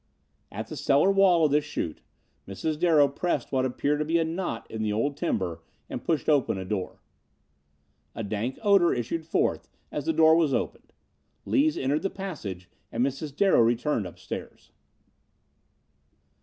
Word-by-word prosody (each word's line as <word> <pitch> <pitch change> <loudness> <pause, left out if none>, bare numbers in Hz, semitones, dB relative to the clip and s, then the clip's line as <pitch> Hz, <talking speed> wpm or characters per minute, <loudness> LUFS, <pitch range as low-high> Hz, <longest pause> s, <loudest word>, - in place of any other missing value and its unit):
At - - -5
the - - -8
cellar 145 +8 +3
wall 190 -4 +5
of 150 - +1
this 150 +1 +3
chute, 85 - -4 0.5
Mrs. 150 +11 -3
Darrow 160 -5 +5
pressed 155 +6 -2
what 130 -1 +1
appeared 145 +3 0
to - - +1
be 165 +2 +2
a 165 - +2
knot 160 -7 -3
in 110 - -5
the 110 -1 0
old 125 +7 0
timber 90 - -2 0.3
and - - -5
pushed 160 -3 -1
open 145 -9 +2
a 95 - -5
door. 95 -1 -4 1.1
A 115 - -4
dank 110 +5 -3
odor 200 -5 +4
issued 155 +7 -3
forth - - 0 0.2
as - - -4
the 325 - +2
door 160 - +6
was 160 -4 +2
opened. - - -4 0.5
Lees 295 +2 +2
entered 140 +3 0
the 195 - -1
passage 115 - -6 0.2
and 120 +2 +1
Mrs. 140 +1 -4
Darrow 195 -6 +4
returned 115 -1 +1
upstairs. 90 - -9
145 Hz, 160 wpm, -27 LUFS, 115-165 Hz, 1.1 s, door